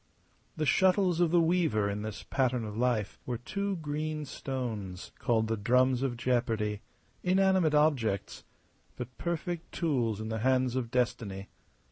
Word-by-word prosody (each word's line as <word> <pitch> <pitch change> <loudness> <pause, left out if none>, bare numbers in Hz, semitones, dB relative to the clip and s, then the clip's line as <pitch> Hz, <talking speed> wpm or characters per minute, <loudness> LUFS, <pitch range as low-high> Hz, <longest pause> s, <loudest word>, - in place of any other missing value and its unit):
The 155 - 0
shuttles 185 +1 +3
of 175 -2 +4
the 175 +1 +4
Weaver 160 - +2
in 100 +1 -2
this 110 -1 -6
pattern 125 -3 0
of 105 -1 -6
life 115 -4 0
were 125 -1 -1
two 200 - -2
green 155 -1 -3
stones 115 -10 -5
called 115 -4 +2
the 115 - 0
drums 125 +4 +3
of 130 -3 -1
jeopardy, 115 -4 0 0.4
inanimate 185 -4 +3
objects, 130 -10 +1 0.5
but 125 0 -7
perfect 170 0 -3
tools 120 -10 0
in 110 0 -4
the 110 0 -2
hands 130 +1 +2
of 125 -3 -1
Destiny. 110 -5 -1
125 Hz, 145 wpm, -30 LUFS, 110-155 Hz, 0.5 s, of